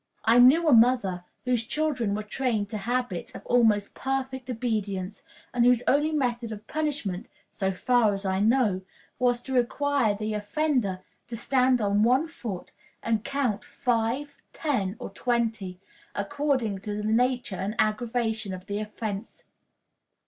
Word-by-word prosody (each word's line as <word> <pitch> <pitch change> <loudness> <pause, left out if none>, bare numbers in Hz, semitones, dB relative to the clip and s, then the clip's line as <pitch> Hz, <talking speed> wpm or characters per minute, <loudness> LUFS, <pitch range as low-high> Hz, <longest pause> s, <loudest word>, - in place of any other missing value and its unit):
I 230 +2 +6
knew 295 +7 +7
a 300 - +6
mother 225 -7 +4 0.2
whose 245 -2 +1
children 265 -10 0
were 215 - -3
trained 215 -2 -1
to 215 - -3
habits 240 -4 -2
of - - -9
almost 220 -4 +3
perfect 265 -1 -3
obedience, 210 -5 -2 0.3
and 245 -1 +3
whose 245 0 +4
only 295 +3 +3
method 240 -6 -1
of 210 0 -8
punishment, 280 -11 -2 0.2
so 190 -1 -1
far 225 +3 +3
as 195 0 -4
I 190 0 0
know, 215 -3 +3 0.4
was 245 -1 +2
to 265 - -5
require 255 -2 +2
the 215 +1 -3
offender 210 -3 0 0.3
to 230 - -5
stand 255 +1 +2
on 205 0 +2
one 255 +7 +4
foot 230 - -7 0.3
and 225 -2 0
count 265 -7 -1
five, 250 +4 -1 0.2
ten, 220 - -1
or - - -7
twenty, 225 -5 -1 0.4
according 255 -2 0
to 205 +1 -4
the 210 - -3
nature 245 0 +1
and 195 +4 -3
aggravation 220 -2 0
of 185 0 -11
the 205 0 -3
offense. 215 0 -5
230 Hz, 150 wpm, -27 LUFS, 205-255 Hz, 0.4 s, knew